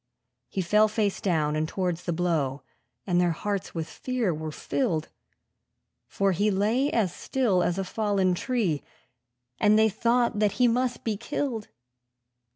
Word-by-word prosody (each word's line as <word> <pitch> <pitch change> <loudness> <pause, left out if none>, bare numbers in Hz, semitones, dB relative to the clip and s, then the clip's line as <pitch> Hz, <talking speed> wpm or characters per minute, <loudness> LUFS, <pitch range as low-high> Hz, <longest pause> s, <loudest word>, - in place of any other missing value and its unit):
He 190 - -2
fell 210 +5 +4
face 210 -2 -1
down, 155 -5 +1
and 155 0 0
towards 180 -3 -2
the 175 - -1
blow; 160 -6 -1 0.4
and 180 -2 +2
their 175 -1 +2
hearts 200 +2 -3
with 165 -1 -3
fear 250 -8 -2
were 155 0 -5
filled, 165 - -1 1.0
For 195 0 +1
he 205 +4 +1
lay 215 +8 +1
as 200 -7 +1
still 230 -9 +1
as 175 0 0
a 195 - 0
fallen 195 -2 +1
tree, 185 - 0 0.8
and 210 0 +5
they 220 0 +5
thought 235 +1 +1
that 210 -2 +2
he 250 - +3
must 245 +1 0
be 220 -3 -1
killed. 235 -2 -3
200 Hz, 155 wpm, -27 LUFS, 175-225 Hz, 1.0 s, and